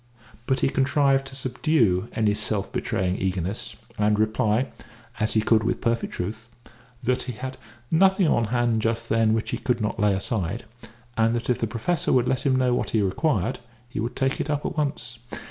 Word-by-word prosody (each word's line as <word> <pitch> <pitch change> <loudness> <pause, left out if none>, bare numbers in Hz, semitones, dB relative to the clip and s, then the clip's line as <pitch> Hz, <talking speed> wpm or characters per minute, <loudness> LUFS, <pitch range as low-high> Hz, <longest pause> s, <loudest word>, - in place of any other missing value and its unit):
But 130 -1 +1
he - - +3
contrived 135 0 +2
to 135 - -7
subdue 125 - +1
any 110 -2 +2
self 105 -1 0
betraying 95 0 -1
eagerness, 95 +3 -2 0.2
and 105 0 +3
reply 110 +3 +1 0.5
(as 105 - +1
he 110 - +4
could 110 -1 +3
with 120 - 0
perfect 115 0 0
truth) 110 +5 -4 0.6
that 125 +1 +1
he - - -2
had 130 +3 -6 0.3
nothing 190 +2 +4
on 120 -6 +2
hand 120 0 +1
just 115 +1 -1
then 110 0 +3
which 115 - -2
he - - -2
could 125 -1 0
not 105 -1 -2
lay 105 -1 +3
aside, 100 +1 -2 0.5
and 115 +1 +2
that 120 +1 -1
if 125 - 0
the 115 - 0
Professor 130 +10 -1
would 125 -1 +3
let 130 +2 0
him 130 - +3
know 130 -1 +2
what - - 0
he 110 - +2
required, 100 - 0 0.3
he 125 - -5
would 115 +3 -3
take 135 0 0
it 145 - -4
up 145 -1 -1
at - - -2
once. 130 -6 -2
115 Hz, 195 wpm, -25 LUFS, 105-130 Hz, 0.6 s, he